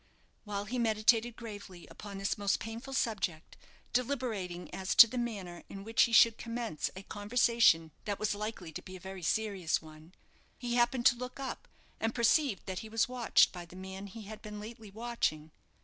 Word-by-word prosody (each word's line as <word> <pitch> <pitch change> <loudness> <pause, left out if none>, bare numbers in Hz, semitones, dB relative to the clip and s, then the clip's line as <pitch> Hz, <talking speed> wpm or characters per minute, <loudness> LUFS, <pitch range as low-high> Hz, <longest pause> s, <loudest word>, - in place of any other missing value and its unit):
While 205 -1 -3
he 245 +4 -3
meditated 225 +1 +3
gravely 205 -6 -9
upon 200 -2 -9
this 195 0 0
most 200 -2 +1
painful 230 +5 -6
subject, 190 -10 -1 0.4
deliberating 230 -9 -2
as 190 0 -2
to - - +12
the 230 - -8
manner 195 -8 -4
in 195 0 -8
which 225 +2 +2
he - - -7
should 230 0 +6
commence 230 -7 -3
a 190 - -8
conversation 205 -6 +3
that 205 -1 -2
was 215 - 0
likely 205 -5 -5
to - - -6
be 185 - -10
a - - -9
very 190 +1 -8
serious 195 -1 0
one, 155 +2 -15 0.4
he 245 -2 -3
happened 240 +1 +2
to 255 - +7
look 250 +2 -7
up, 270 -1 -5 0.3
and 225 +1 -1
perceived 235 - +2
that 185 -1 -4
he 220 - -8
was 225 0 +2
watched 245 -2 +4
by 175 -2 -6
the 175 +1 -14
man 190 +1 -7
he 215 +3 -9
had 215 +1 -9
been 210 -1 -7
lately 220 0 -9
watching. 195 -8 -2
215 Hz, 185 wpm, -32 LUFS, 190-235 Hz, 0.4 s, to